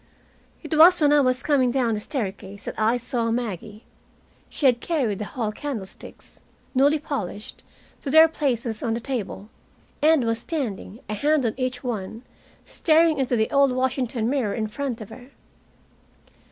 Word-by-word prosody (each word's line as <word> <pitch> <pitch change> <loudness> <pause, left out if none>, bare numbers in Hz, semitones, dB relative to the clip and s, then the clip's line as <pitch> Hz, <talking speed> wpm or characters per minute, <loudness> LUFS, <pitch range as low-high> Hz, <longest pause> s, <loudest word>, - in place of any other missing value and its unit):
It 315 - -3
was 340 +4 +7
when 295 -2 +4
I 295 - +5
was 255 -1 +1
coming 270 -4 +3
down 240 -2 +1
the 210 - -2
staircase 205 -5 -5
that - - -4
I 220 +3 +2
saw 245 -1 -2
Maggie. 220 -2 -4 0.7
She 290 - -4
had 245 -2 +4
carried 255 - -1
the 210 - -3
hall 220 -1 -3
candlesticks, 220 -6 -8 0.3
newly 285 +3 +4
polished, 245 - -5 0.4
to 280 - -5
their 315 +3 +8
places 245 -8 -2
on 230 -1 -1
the - - -2
table, 225 -5 -5 0.5
and 310 -2 +4
was 230 0 0
standing, 235 - -5
a 215 - -4
hand 290 +5 +1
on 225 - 0
each 255 0 -3
one, 225 -1 -5 0.4
staring 320 -2 +3
into 255 -2 +1
the 220 -1 0
old 275 -2 +4
Washington 255 -3 -1
mirror 250 -6 0
in 220 - -1
front 245 +1 -4
of 215 - -8
her. 245 +3 -12
245 Hz, 165 wpm, -24 LUFS, 220-280 Hz, 0.7 s, their